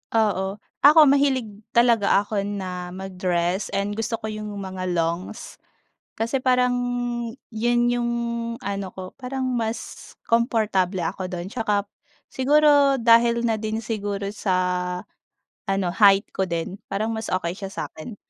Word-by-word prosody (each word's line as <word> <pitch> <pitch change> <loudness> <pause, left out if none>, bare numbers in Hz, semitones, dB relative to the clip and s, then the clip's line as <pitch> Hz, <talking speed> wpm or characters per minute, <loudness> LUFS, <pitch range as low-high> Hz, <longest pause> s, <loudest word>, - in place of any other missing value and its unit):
Oo, 195 -3 +1 0.2
ako 300 +3 +7
mahilig 275 -5 +3 0.2
talaga 230 -4 +4
ako 205 0 -2
na 185 -3 -4
mag-dress 185 -1 -1
and 200 +1 0
gusto 225 +2 -2
ko 220 -1 -5
yung 215 0 -5
mga 190 -2 -5
longs 170 +6 -3 0.6
kasi 230 +4 -1
parang 250 -1 +3 0.8
yun 240 +2 +1
yung 240 0 0 0.5
ano 200 -1 -3
ko 185 0 -9
parang 265 +1 -4
mas 230 -1 -4
komportable 215 -6 +1
ako 185 +3 -3
do'n 180 0 -5
'tsaka 210 -4 0 0.5
siguro 285 +1 +4
dahil 235 0 +5
na 225 -2 +1
din 220 +1 -3
siguro 205 -2 -3
sa 195 -3 -1 1.2
ano 195 -2 +1
height 200 0 +5
ko 190 - -1
din 170 +3 -3
parang 215 +3 -1
mas 220 0 -4
okey 175 -2 -1
siya 195 - -5
sa 195 - -5
akin. 205 +8 -9
210 Hz, 135 wpm, -24 LUFS, 190-235 Hz, 1.2 s, ako